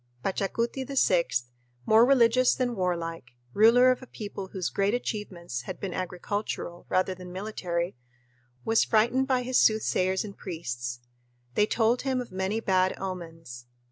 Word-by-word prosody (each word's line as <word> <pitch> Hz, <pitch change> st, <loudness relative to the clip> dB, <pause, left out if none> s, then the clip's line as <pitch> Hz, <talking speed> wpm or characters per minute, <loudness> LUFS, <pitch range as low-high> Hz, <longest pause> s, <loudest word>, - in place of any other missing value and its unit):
Pachacuti 230 Hz, +7 st, -1 dB
VI, 220 Hz, -10 st, +2 dB, 0.6 s
more 220 Hz, +1 st, +6 dB
religious 255 Hz, -1 st, +4 dB
than 245 Hz, -2 st, -1 dB
warlike, 165 Hz, -, -3 dB, 0.2 s
ruler 240 Hz, -, +6 dB
of 255 Hz, -, -2 dB
a 255 Hz, -, -11 dB
people 200 Hz, -4 st, -7 dB
whose 190 Hz, -2 st, -3 dB
great 200 Hz, +3 st, +1 dB
achievements 180 Hz, -, -4 dB
had -, -, -5 dB
been 190 Hz, -3 st, -4 dB
agricultural 180 Hz, 0 st, -4 dB
rather 185 Hz, 0 st, +1 dB
than 180 Hz, -1 st, -10 dB
military, 180 Hz, -3 st, -3 dB, 0.7 s
was 225 Hz, 0 st, +4 dB
frightened 240 Hz, +4 st, +2 dB
by 255 Hz, -2 st, +1 dB
his 255 Hz, +1 st, +2 dB
soothsayers 190 Hz, -3 st, +2 dB
and 200 Hz, -1 st, -9 dB
priests; 125 Hz, -9 st, -5 dB, 0.5 s
they 210 Hz, +9 st, +3 dB
told 235 Hz, +2 st, +2 dB
him 265 Hz, -2 st, 0 dB
of 245 Hz, -, -6 dB
many 190 Hz, +4 st, -1 dB
bad 185 Hz, -3 st, +1 dB
omens. 165 Hz, -10 st, -7 dB
195 Hz, 140 wpm, -27 LUFS, 180-230 Hz, 0.7 s, more